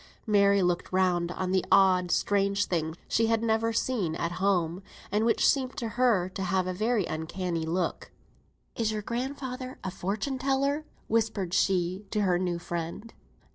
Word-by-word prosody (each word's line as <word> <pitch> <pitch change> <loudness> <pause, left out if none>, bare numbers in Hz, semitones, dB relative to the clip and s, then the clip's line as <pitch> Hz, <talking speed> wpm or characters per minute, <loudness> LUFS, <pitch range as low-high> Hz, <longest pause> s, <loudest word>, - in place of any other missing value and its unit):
Mary 200 -3 +4
looked 175 0 0
round 180 -2 +1
on 185 0 -3
the 185 -1 +2
odd, 185 -2 +5
strange 200 +1 +1
things 160 -2 -2
she 225 0 +2
had 225 0 +1
never 225 0 +1
seen 225 -8 -1
at 170 +1 -2
home, 180 -3 +1 0.3
and 210 +2 +2
which 230 - +3
seemed 260 -2 +1
to 230 - -2
her 230 -6 +2
to 185 +1 -7
have 185 0 +1
a 185 - -2
very 215 +1 +1
uncanny 165 +1 -3
look. 175 +1 -2 0.7
"Is 225 -2 0
your 215 -1 -3
grandfather 255 +2 -4
a 190 - -3
fortune 215 +10 -3
teller?" 275 +3 0 0.2
whispered 220 -5 0
she 185 +1 +1
to 210 - 0
her 180 -3 +2
new 180 -2 -1
friend. 170 +6 -5
195 Hz, 165 wpm, -28 LUFS, 180-230 Hz, 0.7 s, odd